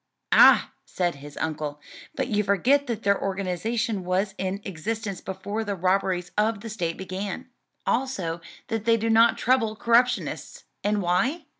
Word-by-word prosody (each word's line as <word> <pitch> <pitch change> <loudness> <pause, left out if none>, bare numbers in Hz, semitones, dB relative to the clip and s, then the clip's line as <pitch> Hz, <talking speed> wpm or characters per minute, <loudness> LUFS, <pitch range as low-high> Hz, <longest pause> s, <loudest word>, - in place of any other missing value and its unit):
"Ah!" - - +7
said 175 -2 -1
his 145 +1 -12
uncle, 150 -2 -3 0.4
"but - - -1
you 210 -4 +1
forget 250 +9 +2
that 230 -2 -3
their 200 0 +2
organization 195 +3 -2
was 190 +3 0
in 190 +1 -2
existence 200 +2 -4
before 200 +4 -4
the 205 -2 -3
robberies 185 0 0
of 215 -1 +1
the 225 - -7
state 170 -6 -3
began: 195 +7 -5 0.3
also 195 -11 -1 0.3
that 225 -2 -2
they 230 0 +4
do 225 +1 0
not 230 +1 +5
trouble 230 -4 +2
corruptionists: 240 +2 +1 0.2
and 205 -1 +1
why? 245 - +1
200 Hz, 150 wpm, -25 LUFS, 185-230 Hz, 0.4 s, Ah